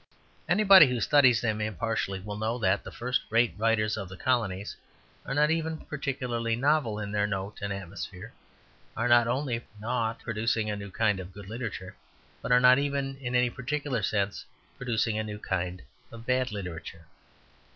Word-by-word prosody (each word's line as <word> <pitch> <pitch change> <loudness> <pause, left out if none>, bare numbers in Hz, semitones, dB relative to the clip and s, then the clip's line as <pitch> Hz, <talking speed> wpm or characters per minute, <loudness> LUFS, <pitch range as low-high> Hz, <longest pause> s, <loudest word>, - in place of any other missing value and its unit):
Anybody 190 -3 +8
who 125 -1 -1
studies 130 -1 +5
them 110 -2 -1
impartially 110 -2 -2
will 105 +1 -6
know 110 +3 -1
that 115 - +1
the - - -7
first 125 +2 -1
rate 115 +1 +3
writers 110 -1 +1
of 100 -3 -5
the 95 - -9
colonies 105 -6 -1 0.5
are 135 - -2
not 150 +1 +4
even 160 0 -1
particularly 125 -6 -2
novel 135 -4 +1
in 100 -1 -4
their 105 0 +1
note 100 0 -4
and 100 0 -3
atmosphere, 100 +2 -7 0.6
are 115 - +1
not 120 -1 +5
only 125 -1 -1 0.2
not 115 0 -1
producing 110 -1 -1
a - - -2
new 100 0 -7
kind 105 0 +1
of 95 0 -8
good 100 0 -10
literature, 105 -4 -6 0.5
but - - -4
are 125 - +7
not 125 +1 +7
even 140 -1 -1
in 125 -2 -4
any 125 -1 +3
particular 135 -1 -2
sense 100 0 -1 0.3
producing 115 -3 -1
a - - -1
new 105 -1 -6
kind 90 -3 -3 0.3
of 115 0 -11
bad 125 -1 +1
literature. 85 -4 -7
115 Hz, 170 wpm, -28 LUFS, 105-125 Hz, 0.6 s, Anybody